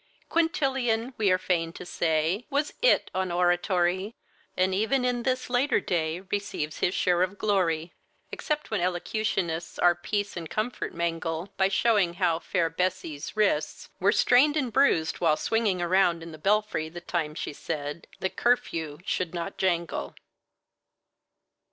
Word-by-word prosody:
Quintilian, 265 -8 +1
we 210 -3 +2
are 185 - +4
fain 170 -3 -1
to 180 - -9
say, 165 +6 0
Was 290 +1 0
It - - +3
on 185 -1 -1
oratory, 180 +3 +1 0.4
And 185 +1 +2
even 250 +6 +1
in 245 -1 0
this 255 +1 -1
later 250 +3 +2
day 165 -1 -1
Receives 190 -6 -3
his 180 - +1
share 180 -1 +2
of 185 +2 0
glory, 175 -6 0 0.4
Except 300 -4 -3
when 215 - 0
elocutionists 175 -2 -2
Our 175 0 +5
peace 205 +3 -3
and 165 -3 -6
comfort 220 +4 -3
mangle, 165 +2 -2
By 190 - +3
showing 195 -3 +2
how 175 -3 +1
fair 170 -1 0
Bessie's 170 -1 -3
wrists 195 -8 0
Were 195 +2 +4
strained 275 +6 +4
and 255 -6 -1
bruised 165 - +3
while 160 -3 +3
swinging 210 -6 0
around 175 -2 +2
in 165 - -8
the 155 - -11
belfry 200 -4 +1
the 175 +2 -8
time 160 -3 -2
she - - -4
said 150 0 -5
the 190 - -1
curfew 165 -11 0
should 180 -1 -2
not 170 +3 -5
jangle. 170 -3 -1
185 Hz, 150 wpm, -27 LUFS, 170-220 Hz, 0.4 s, Our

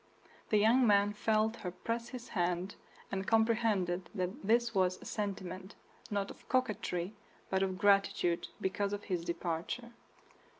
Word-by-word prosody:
The 215 - +4
young 230 +4 +5
man 205 0 +4
felt 220 +1 +1
her 180 - -4
press 230 +6 -3
his 250 -2 -8
hand, 180 0 0 0.4
and 190 0 -2
comprehended 220 -6 +2
that 185 +8 -2
this 235 +2 +3
was 185 -2 +2
a - - -12
sentiment, 190 -2 -4 0.3
not 200 -2 -1
of - - -16
coquetry, 215 -7 0 0.4
but 190 0 +2
of 190 -1 0
gratitude 195 -3 +3
because 200 +1 -1
of 205 0 -4
his 180 -4 -2
departure. 170 +8 -3
200 Hz, 140 wpm, -33 LUFS, 185-225 Hz, 0.4 s, young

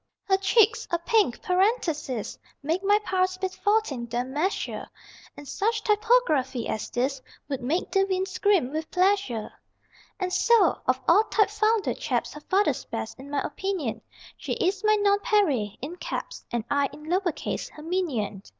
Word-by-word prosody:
Her 385 -1 +2
cheeks 430 +2 +3
(a 340 - +1
pink 370 - +1
parenthesis) 355 - 0 0.3
Make 330 +6 -1
my 410 +1 +5
pulse 370 0 +1
beat 375 0 -3
14 410 - 0
em 245 +2 -2
measure, 345 +7 -2 0.5
And 290 - -10
such 430 - -1
typography 415 - +2
as 215 - -3
this 260 +2 -1 0.3
Would 275 -3 -3
make 300 +9 -1
=De 390 -1 +3
Vinne= 375 -1 0
scream 375 -7 +1
with 315 +1 -4
pleasure. 370 - +1 0.7
And 365 -1 -2
so, 455 -7 +4
of 255 0 +2
all 405 +6 +6
typefounder 430 0 +1
chaps - - -1
Her 300 - -10
father's 390 +6 +1
best, - - -6
in 275 +2 -10
my 285 -1 -1
opinion; 360 - -3 0.4
She - - -4
is 380 +3 0
my 430 0 +5
NONPAREIL 405 - +2
(IN 330 +6 -5
CAPS) - - -5
And 235 -2 -1
I 285 +1 +1
(in 300 - -12
lower 355 +3 0
case) - - -4
her 300 - -12
minion. 285 - -2
370 Hz, 160 wpm, -26 LUFS, 280-405 Hz, 0.7 s, all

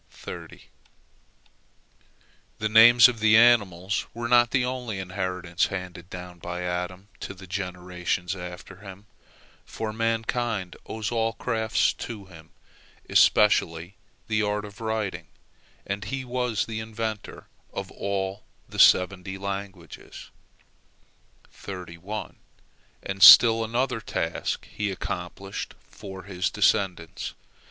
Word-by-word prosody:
The 110 - -1
names 115 +2 +8
of 120 -2 -4
the 110 0 +5
animals 100 -5 +3
were 120 0 -3
not 120 -1 +5
the 125 -1 +1
only 125 -5 -4
inheritance 90 -2 -2
handed 90 -2 -7
down 90 -1 -9
by 90 +1 -5
Adam 90 +2 -4
to 100 - -7
the 95 +1 -12
generations 90 -1 -3
after 90 +1 -9
him, 100 0 -12 0.6
for 110 -1 -5
mankind 115 -3 -1
owes 110 0 -4
all 115 -1 0
crafts 110 0 0
to 110 -4 -7
him, 80 -4 -15 0.6
especially 85 -4 +3 0.3
the 110 -1 +1
art 105 0 -1
of 105 +2 -12
writing, 110 -3 -3 0.6
and 100 +1 -4
he 135 +3 -4
was 125 -3 -1
the 110 -1 -5
inventor 110 -1 -5 0.3
of - - -6
all 100 0 -3 0.3
the - - -8
seventy 95 +1 +4
languages. 95 -3 -7 1.3
And 95 +1 -9
still 115 +3 +10
another 120 +1 -1
task 80 -5 -3
he 105 -1 -3
accomplished 95 +1 -5
for 95 -2 -10
his 90 -1 -2
descendants. 95 -5 0
100 Hz, 110 wpm, -26 LUFS, 90-110 Hz, 1.3 s, still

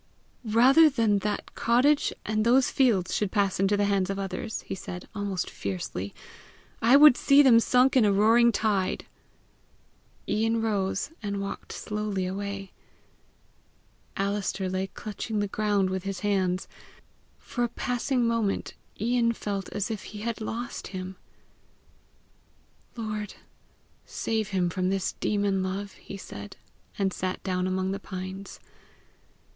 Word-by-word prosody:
"Rather 255 +8 +6
than 225 -7 +2
that 210 +1 -3
cottage 260 +6 +3
and 215 0 0
those 250 +3 +4
fields 225 -10 +2
should 205 -3 0
pass 200 -3 +1
into 195 +1 +3
the 205 - +2
hands 195 -2 +1
of 195 - -2
others," 195 +2 -4
he - - -5
said, 180 -1 -7
almost 200 -3 -2
fiercely, 95 0 -4 0.7
"I 240 +5 +7
would 295 -3 +9
see 280 +3 +5
them 240 -4 +7
sunk 250 +3 +3
in 255 - +6
a 205 - +4
roaring 225 +4 +5
tide!" 205 -4 0 1.2
Ian 225 +1 +1
rose, 200 0 -1
and 200 -2 -3
walked 200 0 -6
slowly 210 -3 -3
away. 195 +1 -4 1.5
Alister 195 -1 -1
lay 185 +1 -2
clutching 215 +2 -5
the 205 - 0
ground 200 -2 +1
with 190 0 -2
his 195 0 -5
hands. 190 -3 0 0.7
For 245 - -3
a - - -4
passing 245 +1 -1
moment 230 -3 0 0.3
Ian 235 +1 +2
felt 200 -3 -4
as 210 +2 -3
if 210 -3 -5
he 210 -1 -8
had 230 0 -3
lost 235 +2 -4
him. 185 0 -6 1.8
"Lord, 215 -3 -4 0.7
save 220 -2 -2
him 185 -3 0
from 185 +1 0
this 190 -1 -1
demon 200 -2 +1
love," 195 +2 -3
he 195 - -10
said, 100 - -9 0.4
and 195 -2 0
sat 185 0 -3
down 185 -1 -1
among 185 0 -1
the 195 - -3
pines. 190 0 -7
205 Hz, 140 wpm, -27 LUFS, 190-225 Hz, 1.8 s, would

